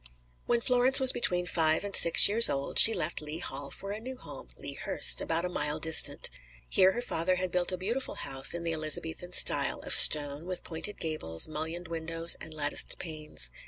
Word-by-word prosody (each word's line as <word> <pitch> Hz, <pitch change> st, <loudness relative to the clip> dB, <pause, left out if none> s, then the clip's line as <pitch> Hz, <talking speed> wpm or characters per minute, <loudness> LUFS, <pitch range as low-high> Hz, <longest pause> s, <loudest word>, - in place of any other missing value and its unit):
When 235 Hz, -1 st, -2 dB
Florence 250 Hz, +3 st, +3 dB
was 260 Hz, -1 st, +5 dB
between 180 Hz, -6 st, -2 dB
five 160 Hz, -1 st, -2 dB
and 200 Hz, -1 st, -6 dB
six 170 Hz, -, +6 dB
years 225 Hz, +3 st, +6 dB
old, 140 Hz, 0 st, -2 dB
she 225 Hz, -, +9 dB
left 155 Hz, +1 st, -5 dB
Lea 150 Hz, +1 st, -8 dB
Hall 140 Hz, -3 st, -9 dB
for 195 Hz, -, -10 dB
a 210 Hz, -, -8 dB
new 255 Hz, +3 st, -11 dB
home, -, -, -15 dB
Lea -, -, -6 dB
Hurst, -, -, +1 dB
about 165 Hz, +2 st, -3 dB
a -, -, -4 dB
mile 150 Hz, -4 st, -3 dB
distant. 160 Hz, -1 st, +3 dB, 0.4 s
Here 185 Hz, -, 0 dB
her 240 Hz, -, -7 dB
father 185 Hz, -4 st, -4 dB
had 180 Hz, 0 st, -5 dB
built 180 Hz, +1 st, -2 dB
a 185 Hz, -, -6 dB
beautiful 230 Hz, +9 st, -6 dB
house 135 Hz, +4 st, -1 dB
in 170 Hz, -, -8 dB
the 165 Hz, -1 st, -5 dB
Elizabethan 160 Hz, +3 st, -2 dB
style, -, -, +3 dB
of -, -, -3 dB
stone, 145 Hz, +2 st, +5 dB
with 185 Hz, -1 st, -5 dB
pointed 170 Hz, +5 st, -7 dB
gables, 155 Hz, -, -3 dB
mullioned 160 Hz, +3 st, -8 dB
windows 165 Hz, 0 st, -3 dB
and 160 Hz, -, -7 dB
latticed 150 Hz, -1 st, -2 dB
panes. 155 Hz, -, -5 dB
165 Hz, 195 wpm, -26 LUFS, 155-185 Hz, 0.4 s, she